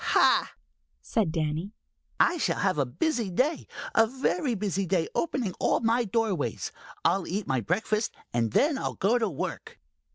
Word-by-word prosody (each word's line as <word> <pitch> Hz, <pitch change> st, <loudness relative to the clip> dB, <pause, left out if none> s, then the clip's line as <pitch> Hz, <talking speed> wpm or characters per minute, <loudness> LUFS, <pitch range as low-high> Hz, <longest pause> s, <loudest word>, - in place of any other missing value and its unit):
"Ha!" -, -, +4 dB, 0.5 s
said 210 Hz, -8 st, 0 dB
Danny, 160 Hz, +4 st, -2 dB, 0.5 s
"I 350 Hz, -, +4 dB
shall -, -, +1 dB
have 185 Hz, -4 st, +1 dB
a 135 Hz, -, +1 dB
busy 230 Hz, -, -1 dB
day, 260 Hz, -, 0 dB, 0.3 s
a 225 Hz, -, +5 dB
very 265 Hz, +2 st, 0 dB
busy 195 Hz, -2 st, -1 dB
day, 175 Hz, -2 st, +1 dB
opening 260 Hz, -, -1 dB
all -, -, +2 dB
my 235 Hz, +1 st, +2 dB
doorways. 195 Hz, -, -1 dB, 0.3 s
I'll 195 Hz, -2 st, +2 dB
eat 195 Hz, +3 st, -2 dB
my 130 Hz, -2 st, 0 dB
breakfast, 215 Hz, -, -1 dB, 0.2 s
and 115 Hz, -2 st, +1 dB
then 285 Hz, -1 st, +3 dB
I'll -, -, -3 dB
go 225 Hz, +6 st, +2 dB
to 220 Hz, -3 st, +1 dB
work." 150 Hz, -, -5 dB
205 Hz, 160 wpm, -28 LUFS, 170-240 Hz, 0.5 s, a